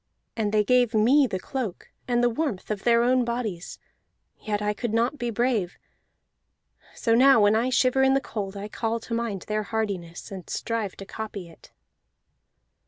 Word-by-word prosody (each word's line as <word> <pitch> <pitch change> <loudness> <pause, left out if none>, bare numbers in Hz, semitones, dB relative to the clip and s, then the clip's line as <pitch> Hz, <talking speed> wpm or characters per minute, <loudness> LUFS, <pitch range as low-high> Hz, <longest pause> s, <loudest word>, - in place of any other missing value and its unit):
"And 215 -2 -1
they 210 0 +3
gave 245 +1 +3
me 260 +6 +5
the 190 - -3
cloak 235 -5 -5 0.2
and 240 -1 +1
the 245 - +4
warmth 230 -7 -3
of 205 -2 -3
their 235 0 +4
own 250 +1 +3
bodies, 235 -7 -4 0.6
yet 210 -1 -2
I 210 0 0
could 225 0 -3
not 240 +5 +1
be 240 - -2
brave. 230 -5 0 1.2
So 230 - +1
now 260 +1 +6
when 205 0 +4
I 235 +3 +1
shiver 255 +1 +3
in 265 0 +4
the - - +4
cold 205 -6 -5
I 200 +1 -5
call 225 +1 -2
to 230 - -7
mind 230 -5 -2
their 215 0 0
hardiness, 200 -5 -4
and 190 -3 -8
strive 225 -4 -3
to 195 - -9
copy 200 -4 -7
it." 165 - -18
225 Hz, 175 wpm, -25 LUFS, 205-245 Hz, 1.2 s, now